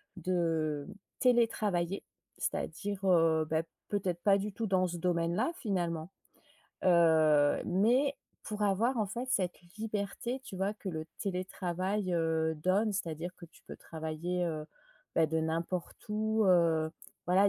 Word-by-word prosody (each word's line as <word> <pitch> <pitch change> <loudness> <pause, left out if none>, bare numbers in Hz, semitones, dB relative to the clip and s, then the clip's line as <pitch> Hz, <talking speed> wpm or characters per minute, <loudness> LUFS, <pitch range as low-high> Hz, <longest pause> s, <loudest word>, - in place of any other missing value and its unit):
de, 165 -5 0 0.3
télétravailler. 210 -7 +2 0.3
C'est-à-dire, 200 -1 -3
heu, 165 -3 +4
bah 160 0 +2 0.3
peut-être 185 -4 -1
pas 200 -1 +5
du 200 0 -3
tout 225 - -2
dans 185 -1 +3
ce 175 - -4
domaine-là 170 - +1
finalement. 175 - -2 0.8
Heu, 160 -4 +5
mais 245 +10 +3 0.3
pour 210 0 -4
avoir, 220 +6 +2
en 210 - +1
fait, 240 +6 -4
cette 185 -8 0 0.2
liberté, 220 +4 -3
tu 195 -7 -9
vois? 195 +2 0
Que 210 -2 -7
le 160 -3 -3
télétravail, 185 0 -2
heu, 160 -1 +1
donne, 195 +7 +2
c'est-à-dire 175 -2 -3
que - - -11
tu - - -22
peux - - -8
travailler, 160 +3 -3
heu, 155 -2 -3 0.5
bah 160 -1 +4
de 160 +1 0
n'importe 165 +2 -2
où 220 +1 +1
heu, 165 -3 +4 0.4
voilà 190 +3 +5
180 Hz, 135 wpm, -32 LUFS, 165-205 Hz, 0.8 s, pas